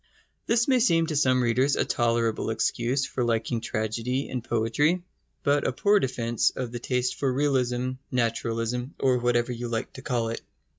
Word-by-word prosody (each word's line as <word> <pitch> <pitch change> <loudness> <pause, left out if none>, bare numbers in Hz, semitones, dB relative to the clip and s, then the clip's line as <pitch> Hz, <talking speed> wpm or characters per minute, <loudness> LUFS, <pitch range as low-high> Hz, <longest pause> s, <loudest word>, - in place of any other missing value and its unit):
This 235 0 +2
may 260 -2 +4
seem 165 -9 +3
to 160 -1 -3
some 130 -3 +3
readers 125 +4 +2
a - - +1
tolerable 115 -2 0
excuse 120 +4 0
for 125 - -2
liking 115 0 0
tragedy 115 +5 -2
and 125 -3 -4
poetry, 135 +10 +1 0.4
but 145 0 +2
a - - +1
poor 205 +10 +3
defence 120 - 0
of 125 -3 -5
the 120 - -5
taste 125 0 -1
for 135 -2 +1
realism, 130 -2 0 0.2
naturalism, 115 +1 -1
or 130 -2 +3
whatever 120 0 +1
you 120 0 -4
like 115 -1 -3
to 130 - -9
call 120 -5 -1
it. 115 - -4
125 Hz, 170 wpm, -26 LUFS, 115-135 Hz, 0.4 s, may